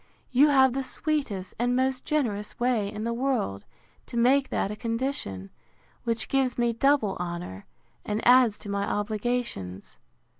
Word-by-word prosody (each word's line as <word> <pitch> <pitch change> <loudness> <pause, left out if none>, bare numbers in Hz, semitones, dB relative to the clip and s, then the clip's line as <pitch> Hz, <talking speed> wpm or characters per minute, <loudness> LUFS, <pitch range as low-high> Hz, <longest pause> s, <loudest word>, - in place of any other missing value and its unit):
you 270 +4 +6
have 265 -3 +5
the 270 - -1
sweetest 265 -9 -2
and 245 +1 +1
most 260 0 0
generous 220 -9 -1
way 235 -5 +1
in 210 0 -5
the 235 +1 -1
world, 235 - -1 0.4
to 235 - -6
make 260 +3 +3
that 195 - -1
a - - -4
condition, 230 - -3 0.5
which 230 -1 0
gives 265 -2 +1
me 240 -1 +1
double 230 -5 +2
honour, 170 - -5 0.4
and 210 +2 -2
adds 245 -4 +6
to - - -11
my 200 0 -1
obligations. 210 - -3
235 Hz, 150 wpm, -27 LUFS, 205-260 Hz, 0.5 s, you